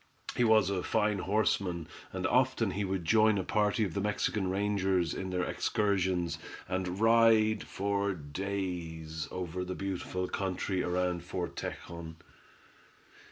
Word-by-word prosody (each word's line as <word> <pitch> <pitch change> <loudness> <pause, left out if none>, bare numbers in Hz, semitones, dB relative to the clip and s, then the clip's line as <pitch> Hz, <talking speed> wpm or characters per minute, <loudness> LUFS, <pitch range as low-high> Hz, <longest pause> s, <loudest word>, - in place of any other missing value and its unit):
He 125 - +2
was 110 -4 +5
a 95 -2 0
fine 105 -1 +1
horseman, 95 -4 0 0.2
and 95 0 -3
often 125 -2 +2
he 100 +2 -2
would 95 -3 -2
join 110 +4 +5
a 95 - 0
party 105 +3 +1
of 90 - -4
the 100 - -1
Mexican 105 -1 0
rangers 95 -3 +1
in 95 - -4
their 90 0 0
excursions, 95 -7 0 0.3
and 90 +1 -2
ride 115 -1 +5
for 100 0 -1
days 80 -1 -4
over 90 0 -4
the 90 0 -4
beautiful 95 -1 -3
country 95 0 -1
round 90 -1 0
Fort 90 0 -4
Tejon. 85 -1 -6
95 Hz, 135 wpm, -31 LUFS, 90-105 Hz, 0.3 s, was